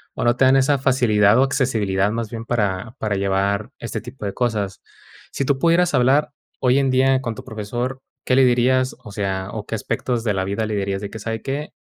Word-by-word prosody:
o - - -3
no 120 +1 +2
te 130 - +4
dan 130 +1 +5
esa 140 +2 +3
facilidad 120 -5 +3
o 130 - +5
accesibilidad, 110 -8 +1
más 115 -1 -3
bien, 115 -1 -6
para 105 -1 -1
para 105 -3 -1
llevar 100 +4 0
este 115 -1 -5
tipo 120 +1 -11
de 100 - -3
cosas. 105 -6 -2 0.5
Sí 140 - -1
tú 135 0 0
pudieras 170 +2 +3
hablar 135 +4 +3 0.3
hoy 130 +2 +3
en 135 - +1
día 130 0 +3
con 115 -4 -4
tu - - -9
profesor, 120 +4 -4 0.2
¿qué 130 - +2
le 130 - +6
dirías? 130 +1 +2
O 105 - -10
sea, 95 -1 -3
o 105 -2 -6
¿qué 110 - -4
aspectos 115 +2 -2
de 105 -3 +1
la 95 0 -1
vida 100 +3 -2
le 110 -1 -3
dirías 100 -1 -2
de 100 - -5
que: 110 - -8
"Sabe 110 +1 -4
qué? 140 +3 -4
115 Hz, 220 wpm, -21 LUFS, 105-130 Hz, 0.5 s, le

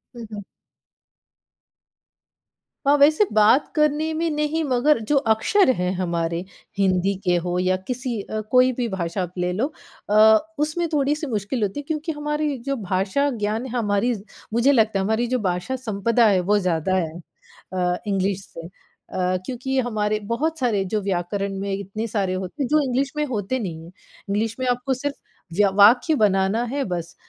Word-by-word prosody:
हुँ, 235 - -7
हुँ। 205 -1 -7 2.4
हाँ, 285 +1 +5
वैसे 305 +8 +5
बात 215 +6 +4
करने 305 +1 +1
में 330 +1 0
नहीं 300 +2 -1
मगर 270 0 +2
जो 295 - +3 0.2
अक्षर 320 - +2
हैं 180 0 -1
हमारे 170 -1 -2 0.3
हिंदी 190 0 +2
के 180 -1 +2
हो 175 0 -1
या 185 0 +2
किसी 245 -3 -3
अ, 215 +2 -4
कोई 255 0 +5
भी 240 - 0
भाषा 185 -1 -3
आप 175 - -7
ले 180 0 0
लो 235 +9 0 0.4
अ, 215 +1 +7 0.2
उसमें 310 +3 0
थोड़ी-सी 295 +1 0
मुश्किल 215 +1 -2
होती 205 +8 -2
है - - -6
क्योंकि 315 +1 -2
हमारी 295 -1 -2
जो 275 - 0
भाषा 195 +10 0
ज्ञान 215 +4 -1
हमारी 225 +1 +1 0.4
मुझे 235 +5 +4
लगता 220 -6 +3
है - - 0
हमारी 220 +3 0
जो 255 +1 0
भाषा 185 +5 -2
संपदा 230 -1 +1
है 195 -3 +4
वो 210 - +5
ज़्यादा 180 0 0
है 165 -4 0 0.6
अ, 180 -1 0
इंग्लिश 195 0 -1
से। 165 0 -10
अ, 185 0 -4
क्योंकि 260 +1 -2
हमारे 215 -3 0 0.2
बहुत 320 +3 -1
सारे 220 -6 +1
जो 210 - +1
व्याकरण 195 +1 -2
में 200 0 -3
इतने 200 +3 -4
सारे 200 -4 -1
होते 190 - -4
हैं - - -1
जो 305 +2 +3
इंग्लिश 270 +1 0
में 300 - +1
होते 255 -1 -2
नहीं 165 -6 -5
हैं। 170 - -12 0.4
इंग्लिश 215 +2 -1
में 255 - -1
आपको 250 +2 0
सिर्फ़ 285 +3 -4 0.4
व्य 205 - +5
वाक्य 245 +9 +6
बनाना 195 +3 +2
है 285 - 0
बस 170 0 -5
220 Hz, 170 wpm, -23 LUFS, 190-270 Hz, 2.4 s, अ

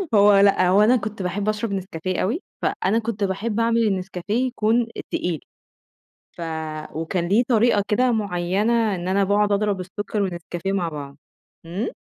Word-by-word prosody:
هو 205 0 +7
لأ، 195 -2 +4
هو 195 +3 +5
أنا 235 +4 +5
كنت 215 -3 -3
باحب 200 +3 -1
أشرَب 215 0 -2
نسكافيه 185 -2 -3
أوي، 245 - -1 0.2
فأنا 215 +4 +1
كنت 220 -2 -3
باحب 205 +3 -1
أعمل 230 0 +2
النسكافيه 195 +5 -1
يكون 235 -1 +1 0.2
تقيل، 170 -4 -1 0.9
ف - - -11 0.5
وكان 170 +2 -2
ليه 210 +6 +4
طريقة 225 -3 +3
كده 250 +4 +2
معيّنة 205 +2 +1
إن 175 0 -5
أنا 195 +2 +2
باقعُد 205 +1 +2
أضرب 205 -1 +1
السُّكّر 205 +3 -4
والنسكافيه 175 0 -3
مع 185 -4 0
بعض. 140 -2 -8 0.5
إمم؟ 185 +8 -3
200 Hz, 155 wpm, -23 LUFS, 185-220 Hz, 0.9 s, هو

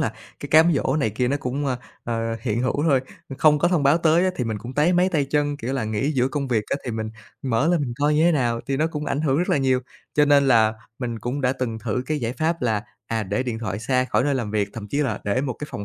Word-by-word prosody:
là - - 0 0.3
cái - - -6
cám 160 +2 +6
dỗ 140 0 +1
này 110 -8 +1
kia 125 +4 0
nó 140 - +1
cũng, 135 +1 -3
ơ, 130 - 0 0.3
ờ, 115 -1 -2
hiện 115 -1 -1
hữu 135 +3 0
thôi. 145 -5 +3 0.4
Không 150 -1 +5
có 175 +4 +3
thông 175 -5 +1
báo 140 +4 +4
tới 165 +2 +3
á 185 - +2
thì 125 - -1
mình 110 -2 -3
cũng 120 +5 -8
táy 155 +5 +3
máy 180 +1 +3
tay 155 -6 +1
chân, 145 +1 0
kiểu 130 0 -4
là, 130 -5 -1
nghỉ 110 +7 -1
giữa 130 -1 +1
công 140 -1 -3
việc 110 -4 +1
á - - +1
thì 120 - -3
mình 110 -1 -3 0.3
mở 130 +4 +1
lên 175 -3 +2
mình 120 -4 -3
coi 150 +1 +3
như 155 +2 +3
thế 175 - +5
nào, 120 -5 0
thì 135 - -1
nó 155 +3 +2
cũng 150 -2 -4
ảnh 140 - -1
hưởng 145 -2 +1
rất 175 - 0
là - - +3
nhiều. 130 -2 +2 0.3
Cho 150 - +5
nên 140 -1 +4
là 110 -3 +5 0.3
mình 120 -3 -3
cũng 125 +5 -3
đã 130 0 +2
từng 120 -4 -3
thử 125 +3 -2
cái 155 -1 -1
giải 115 -2 -2
pháp 160 +3 -1
là, 110 -4 +1 0.2
à, 115 -1 -1
để 100 +5 -1
điện 120 -3 -3
thoại 105 -4 -3
xa 125 +3 +1
khỏi 130 +1 +1
nơi 145 -1 +1
làm 115 -5 -2
việc, 105 -2 0
thậm 105 -2 -7
chí 140 - -2
là 125 -8 0
để 105 +5 +1
một 135 -3 -2
cái 150 - -5
phòng 100 - -5
130 Hz, 295 wpm, -23 LUFS, 115-150 Hz, 0.4 s, cám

